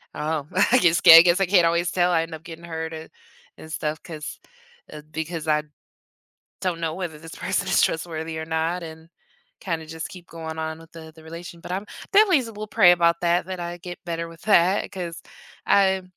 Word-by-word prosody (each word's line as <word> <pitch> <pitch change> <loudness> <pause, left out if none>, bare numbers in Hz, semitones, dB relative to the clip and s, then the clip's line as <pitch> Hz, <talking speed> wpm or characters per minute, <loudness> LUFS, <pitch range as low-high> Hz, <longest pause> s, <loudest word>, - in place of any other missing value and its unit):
Oh, 150 -1 -2 0.2
I 250 - +6
guess 170 -1 +3
I 165 0 +12
guess 175 +2 +3
I 195 - +3
can't 180 -2 +4
always 170 +1 0
tell. 180 0 +2
I 165 -1 +2
end 165 - -8
up 160 0 -9
getting 165 0 -10
hurt 160 -1 -5
and 160 0 -8 0.5
and 160 - -11
stuff 155 0 -3
'cause 155 -4 -8 0.5
uh, 150 - -9
because 160 0 -5
I 150 -1 +2 1.0
don't 175 -3 -2
know 160 -1 -2
whether 170 -4 -5
this 160 +1 -11
person - - -2
is - - +3
trustworthy 160 -1 -2
or 160 - -4
not, 165 +2 -2
and 160 0 -10 0.5
kinda 165 -4 -4
just 160 0 -6
keep 180 -2 -12
going 160 -1 -7
on 160 0 -4
with 165 0 -17
the 160 -1 -11
the 160 - -16
relation 170 +1 -10
But 180 - -7
I'm 195 +3 -3 0.3
definitely 390 -9 +5
still 215 -2 -7
pray 175 -4 +6
about 170 -1 +3
that, 175 0 +2
that 185 -1 -5
I 175 0 -5
get 175 +1 -9
better 165 -1 -4
with 165 -1 -15
that, 190 -2 +3
'cause 175 -3 -6 0.4
I 190 -1 +3
165 Hz, 205 wpm, -24 LUFS, 160-175 Hz, 1.0 s, I